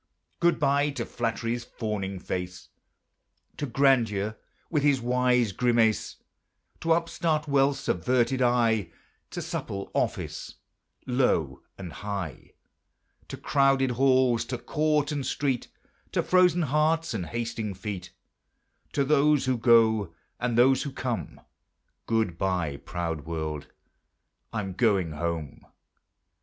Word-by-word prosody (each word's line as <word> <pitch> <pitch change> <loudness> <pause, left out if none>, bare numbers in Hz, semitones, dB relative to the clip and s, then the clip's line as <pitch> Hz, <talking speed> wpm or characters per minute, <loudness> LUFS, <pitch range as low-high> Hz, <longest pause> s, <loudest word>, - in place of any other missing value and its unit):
Good 170 0 +3
bye 140 +1 +2
to 140 - -4
Flattery's 115 0 -2
fawning 105 -5 -4
face; 90 -2 -5 0.9
To 145 - -3
Grandeur 115 -6 +2 0.3
with 150 -3 0
his 140 -2 +3
wise 125 -2 +2
grimace; 115 0 +2 0.6
To 165 0 +2
upstart 165 -2 0
Wealth's 140 0 +2
averted 125 +8 +1
eye; 115 -6 +2 0.4
To - - -5
supple 100 0 -5
Office, - - -2 0.5
low 125 - +1 0.2
and 90 -4 -8
high; 100 -5 -6 0.7
To - - -7
crowded 135 -2 +2
halls, 130 -1 +3
to 125 - -4
court 150 +2 0
and 145 -2 -2
street; 130 -1 -1 0.5
To - - +1
frozen 180 -2 +4
hearts 155 +2 +1
and 95 -6 -3
hasting 115 -3 -3
feet; 95 -1 -6 0.8
To 140 - +2
those 150 0 +3
who 130 0 +1
go, 110 -6 +4 0.2
and 120 -1 -1
those 130 +2 +5
who 140 - -4
come; 125 -3 -4 0.7
Good 110 -7 0
bye, 90 -7 -1
proud 80 -2 -4
world! 80 -3 -4 0.8
I'm 100 -4 -3
going 95 -5 +2
home. 80 -2 -4
120 Hz, 115 wpm, -27 LUFS, 95-135 Hz, 0.9 s, those